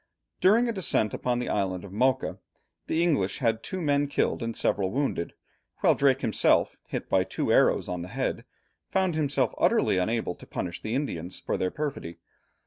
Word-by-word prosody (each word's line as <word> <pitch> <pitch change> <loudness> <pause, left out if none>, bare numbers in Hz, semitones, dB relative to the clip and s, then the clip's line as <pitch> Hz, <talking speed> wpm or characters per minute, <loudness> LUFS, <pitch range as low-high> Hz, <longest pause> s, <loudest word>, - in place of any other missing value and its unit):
During 225 +6 +4
a - - 0
descent 170 - +1
upon 125 -1 -1
the 125 - -3
island 95 -2 -1
of 95 - -11
Mocha, 130 +5 +1 0.5
the 165 +1 +1
English 140 - +1
had 115 -4 0
two 190 - -5
men 145 -3 +1
killed 140 - 0
and 115 0 -3
several 95 -2 +1
wounded, 130 -7 -2 0.5
while - - +5
Drake 135 -1 +2
himself, 110 - +2
hit - - -4
by - - +3
two - - -1
arrows - - +3
on 90 -1 -3
the 90 - -6
head, - - -2 0.5
found 190 -2 +1
himself 150 -3 0
utterly 95 - +3
unable 110 0 -1
to - - -15
punish 85 -2 -4
the 110 +2 -3
Indians 90 - -3
for - - -2
their 90 - 0
perfidy. 135 - -5
125 Hz, 180 wpm, -27 LUFS, 95-145 Hz, 0.5 s, while